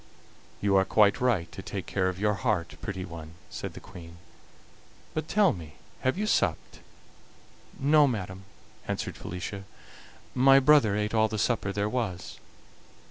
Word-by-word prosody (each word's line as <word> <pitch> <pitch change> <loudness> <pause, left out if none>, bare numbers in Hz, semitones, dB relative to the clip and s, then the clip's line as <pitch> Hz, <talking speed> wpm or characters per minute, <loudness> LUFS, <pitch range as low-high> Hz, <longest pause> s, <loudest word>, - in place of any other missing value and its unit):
"You 100 -1 +2
are 95 - +5
quite 105 +5 +3
right 105 -10 +1
to - - -8
take 95 -1 -5
care 95 -2 0
of 90 - -5
your 105 +1 +2
heart, 105 -6 -1
pretty 95 -2 -4
one," 85 -2 -10 0.2
said - - -5
the - - -7
Queen. 85 -2 -12 1.0
"But 155 0 -3
tell 200 -5 +4
me, 80 -5 -10 0.2
have 130 +6 0
you 210 - 0
supped?" 215 - 0 1.0
"No, 145 +1 +5
madam," 95 -5 -4 0.4
answered - - -3
Felicia; 95 +2 -6 0.7
"my 135 +1 +6
brother 135 -7 +5
ate 105 +1 -1
all 110 -1 +4
the 110 0 -4
supper 105 -2 0
there 100 +1 -1
was." 105 -6 -3
105 Hz, 150 wpm, -28 LUFS, 95-125 Hz, 1.0 s, my